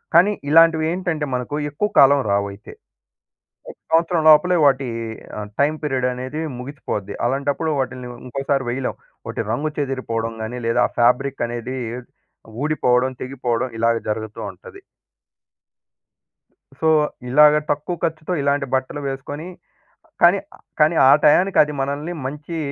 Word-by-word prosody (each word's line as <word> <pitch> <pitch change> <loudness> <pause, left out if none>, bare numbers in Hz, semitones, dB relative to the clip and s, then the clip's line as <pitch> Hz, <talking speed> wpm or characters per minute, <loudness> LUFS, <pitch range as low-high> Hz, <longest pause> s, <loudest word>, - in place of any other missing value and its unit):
కానీ 180 +5 +6 0.2
ఇలాంటివి 160 0 +5
ఏంటంటే 175 -4 -2
మనకు 125 +3 -3 0.2
ఎక్కువ 210 +9 -1
కాలం 140 0 +6
రావయితే. 100 +1 -3 1.0
ఒక - - -12 0.2
సంవత్సరం 165 0 +2
లోపలే 175 +4 +5
వాటి 135 -2 +2 0.5
ఆహ్, 105 -1 -6
టైమ్ 150 +2 +2
పీరియడ్ 130 -3 0
అనేది 130 +5 -5 0.2
ముగిసిపోద్ది. 125 -7 -5
అలాంటప్పుడు 140 +5 -1
వాటిని 130 -1 -4 0.2
ఇంకోసారి 135 +1 -1
వెయ్యలేం. 130 +1 -3 0.3
వాటి - - -3
రంగు 150 +6 -1
చెదిరిపోవడం 115 -5 -2
గాని 115 +3 -5
లేదా, 115 - +2
ఆ - - -23
ఫాబ్రిక్ 125 +2 +2
అనేది 120 +2 -5 0.9
ఊడిపోవడం, 130 -4 +2
తెగిపోవడం 130 -1 -2
ఇలాగ 115 +1 +2
జరుగుతూ 110 0 -5
ఉంటది. 435 -5 -14 2.0
సో, 160 - +2 0.4
ఇలాగ 150 +3 +6 0.2
తక్కువ 150 +4 -2
ఖర్చుతో 160 +1 -2
ఇలాంటి 140 0 +1
బట్టలు 130 +3 -3
వేసుకొని 145 +4 -6 0.8
కానీ, 175 +3 +6 0.4
కానీ 155 +2 +4
ఆ - - +8
టయానికి 180 +6 +4
అది 150 0 -5
మనల్ని 145 +5 -3
మంచి 150 +4 -6
140 Hz, 125 wpm, -21 LUFS, 125-155 Hz, 2.0 s, ఆ